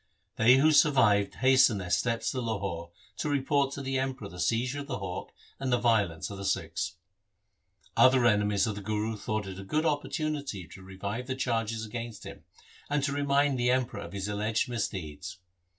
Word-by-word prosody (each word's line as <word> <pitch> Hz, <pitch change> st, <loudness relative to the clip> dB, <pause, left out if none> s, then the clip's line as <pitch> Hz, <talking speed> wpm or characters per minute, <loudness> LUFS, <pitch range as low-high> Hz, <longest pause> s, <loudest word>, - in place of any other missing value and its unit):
They 120 Hz, +3 st, +6 dB
who 155 Hz, +4 st, +5 dB
sur 150 Hz, 0 st, +6 dB
vived 100 Hz, -6 st, +3 dB
hastened 130 Hz, -5 st, +4 dB
their 90 Hz, -2 st, -6 dB
steps 115 Hz, +2 st, +1 dB
to 130 Hz, -, -3 dB
Lahore 100 Hz, -7 st, -3 dB, 0.3 s
to 150 Hz, -, -2 dB
report 140 Hz, 0 st, +1 dB
to 140 Hz, -, -5 dB
the 135 Hz, 0 st, -1 dB
Emperor 130 Hz, -6 st, -3 dB
the 90 Hz, -, -11 dB
seizure 120 Hz, -, 0 dB
of 140 Hz, -, -7 dB
the 130 Hz, -, -3 dB
hawk 95 Hz, -2 st, -6 dB, 0.3 s
and 135 Hz, -1 st, -2 dB
the 125 Hz, -, +4 dB
violence 105 Hz, -9 st, +1 dB
of 100 Hz, -, -7 dB
the -, -, -5 dB
Sikhs. -, -, -2 dB, 1.0 s
Other 130 Hz, -1 st, +5 dB
enemies 105 Hz, -3 st, +3 dB
of 110 Hz, -, -1 dB
the 100 Hz, -, -7 dB
Guru 110 Hz, +2 st, -2 dB
thought 105 Hz, 0 st, -3 dB
it 95 Hz, 0 st, -7 dB
a -, -, -7 dB
good 155 Hz, +11 st, -1 dB
opportunity 145 Hz, -, -2 dB
to 95 Hz, -, -12 dB
revive 100 Hz, +6 st, -5 dB
the 130 Hz, -, -2 dB
charges 115 Hz, -3 st, -1 dB
against 115 Hz, -1 st, -6 dB
him, -, -, -10 dB, 0.4 s
and 145 Hz, -1 st, 0 dB
to 140 Hz, -, 0 dB
remind 140 Hz, -1 st, +2 dB
the 120 Hz, 0 st, +2 dB
Emperor 125 Hz, -4 st, 0 dB
of 100 Hz, -, -9 dB
his 100 Hz, 0 st, -3 dB
alleged 105 Hz, +4 st, 0 dB
misdeeds. 95 Hz, -6 st, -4 dB
115 Hz, 190 wpm, -29 LUFS, 100-135 Hz, 1.0 s, They